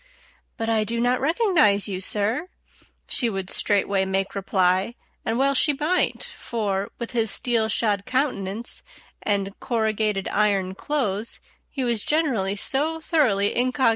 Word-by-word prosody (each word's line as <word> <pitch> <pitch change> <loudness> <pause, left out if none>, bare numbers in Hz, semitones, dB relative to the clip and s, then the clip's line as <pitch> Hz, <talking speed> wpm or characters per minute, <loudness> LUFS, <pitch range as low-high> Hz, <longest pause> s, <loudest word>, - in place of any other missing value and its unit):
"But 225 -2 -2
I 225 -1 +2
do 230 +2 -2
not 245 +1 +1
recognize 310 - +3
you, 190 -2 -4
sir," 215 - -1 0.6
she 240 - +2
would 195 -3 -3
straightway 200 -1 +2
make 195 +1 -1
reply; 190 +2 +1 0.3
and 225 +1 -1
well 275 +1 +3
she 290 +2 +4
might, 310 +6 0
for, 200 -4 -3
with 235 - -5
his 225 -3 +1
steel 225 0 +2
shod 205 -2 0
countenance 235 -5 -2 0.4
and 200 -1 -1
corrugated 220 -4 0
iron 200 -3 +1
clothes, 225 -3 -2 0.3
he 270 - -3
was 235 -4 0
generally 255 -12 +1
so 300 +9 -1
thoroughly 250 - +2
_incog. 255 +1 +2
220 Hz, 140 wpm, -24 LUFS, 200-255 Hz, 0.6 s, she